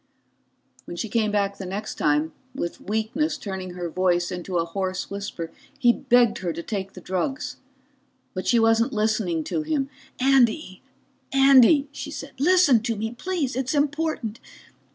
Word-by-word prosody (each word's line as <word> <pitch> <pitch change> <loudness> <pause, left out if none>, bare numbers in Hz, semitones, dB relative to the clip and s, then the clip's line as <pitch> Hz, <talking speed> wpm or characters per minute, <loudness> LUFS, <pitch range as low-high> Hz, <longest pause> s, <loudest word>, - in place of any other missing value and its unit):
When 175 - -7
she 220 - -3
came 220 -2 +1
back 200 -1 0
the 195 - -5
next 205 +3 -4
time, 150 +2 +1 0.2
with 170 -10 -4
weakness 220 - -1
turning 190 -6 -6
her 175 -1 -3
voice 175 0 +1
into 180 0 -3
a 165 - +1
hoarse 185 +2 -3
whisper, 200 -5 -5 0.3
he 240 -4 +5
begged 240 -2 +3
her 180 -2 -2
to 170 - -6
take 195 -1 -4
the 185 - -10
drugs. 190 +10 -3 0.8
But 185 - -4
she 240 - +4
wasn't 225 +1 +3
listening 210 -7 0
to 315 - -2
him. 300 -3 -1 0.3
"Andy, 255 -6 +2 0.5
Andy," 275 +1 +6
she 290 - -6
said, 280 -1 -7
"listen 310 -6 +5
to 230 0 -1
me 220 +2 -3
please. 300 -1 -2
It's 260 +2 -1
important. 290 -6 -1
220 Hz, 155 wpm, -24 LUFS, 185-270 Hz, 0.8 s, Andy